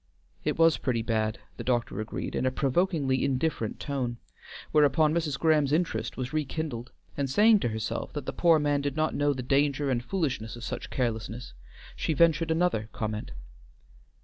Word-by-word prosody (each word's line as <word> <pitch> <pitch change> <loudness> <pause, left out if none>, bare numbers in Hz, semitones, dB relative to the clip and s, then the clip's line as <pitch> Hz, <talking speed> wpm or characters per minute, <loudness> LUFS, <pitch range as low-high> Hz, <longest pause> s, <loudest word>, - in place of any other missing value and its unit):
"It - - -1
was 165 -1 +5
pretty 120 -4 0
bad," 110 -1 0 0.2
the - - -5
doctor 120 -5 0
agreed, 110 - -5
in 130 - 0
a - - +1
provokingly 140 -1 +1
indifferent 130 -4 -1
tone, 130 -5 -2 0.5
whereupon 150 +1 +4
Mrs. 160 -4 -1
Graham's 155 -3 +3
interest 165 +3 0
was 130 +1 -4
rekindled, 150 -5 -3 0.2
and 140 -1 -1
saying 210 - +5
to - - 0
herself 110 -1 -3
that - - -5
the - - -3
poor 170 -2 +4
man 145 -1 +1
did 140 -1 -2
not 155 0 +1
know 145 0 +2
the 130 -2 -3
danger 140 +1 +1
and 120 -2 0
foolishness 130 - -2
of 120 - -10
such - - -5
carelessness, 115 -1 -3 0.4
she 160 - -1
ventured 165 +1 +3
another 160 -10 +1
comment. 110 -1 -3
140 Hz, 170 wpm, -28 LUFS, 120-155 Hz, 0.5 s, was